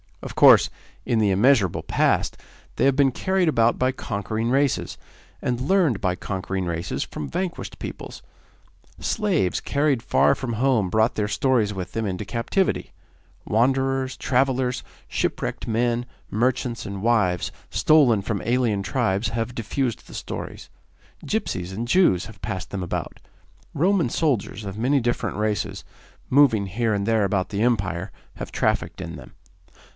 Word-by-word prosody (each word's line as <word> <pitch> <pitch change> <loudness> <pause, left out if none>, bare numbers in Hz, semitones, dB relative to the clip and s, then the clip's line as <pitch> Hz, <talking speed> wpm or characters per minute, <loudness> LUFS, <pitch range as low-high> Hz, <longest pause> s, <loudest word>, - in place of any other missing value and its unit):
Of - - -6
course, - - +7 0.4
in 115 - +1
the 105 -2 +3
immeasurable 100 -1 +3
past, - - +1 0.4
they - - +2
have 135 -1 +4
been 140 -1 +4
carried 190 +6 0
about 115 -6 +3
by 130 0 +2
conquering 110 -1 -3
races, 135 +1 +1 0.5
and 125 0 -1
learned 150 - +2
by 90 -1 +1
conquering 95 -1 -3
races 85 0 -2
from 75 - -6
vanquished 180 -1 -4
peoples. - - -8 0.8
Slaves 195 - 0
carried 140 -4 +1
far 125 - +3
from 130 -3 -4
home 115 -4 +2
brought 110 +4 +2
their 105 -1 0
stories 110 0 +1
with 90 -2 -5
them 115 +1 -2
into 95 +1 -3
captivity. 120 - -1 0.5
Wanderers, 130 +3 +1
travellers, 130 -1 +1 0.2
shipwrecked - - -2
men, 120 +1 0 0.2
merchants, 120 +1 0
and 100 -1 -6
wives 105 -7 +2 0.2
stolen 130 -10 +4
from 100 -1 -2
alien 120 -4 +1
tribes 110 0 0
have 115 +2 -3
diffused 115 +1 -2
the - - -11
stories; - - -6 0.6
gipsies 90 0 -2
and 115 +5 -4
Jews 125 - +3
have - - -13
passed 90 -3 -4
them 100 - -3
about; 90 - -4 0.6
Roman 175 -2 +2
soldiers 115 -7 -1
of 100 +2 -6
many 135 +4 +3
different 120 -4 -1
races, 105 -1 -2 0.5
moved 140 -1 +6
here 110 +3 -1
and 100 -1 -1
there 110 -2 +3
about 95 -1 0
the 100 0 -2
Empire, 95 -6 0 0.2
have - - -7
trafficked - - -1
in - - -6
them. - - -12
115 Hz, 145 wpm, -24 LUFS, 100-130 Hz, 0.8 s, course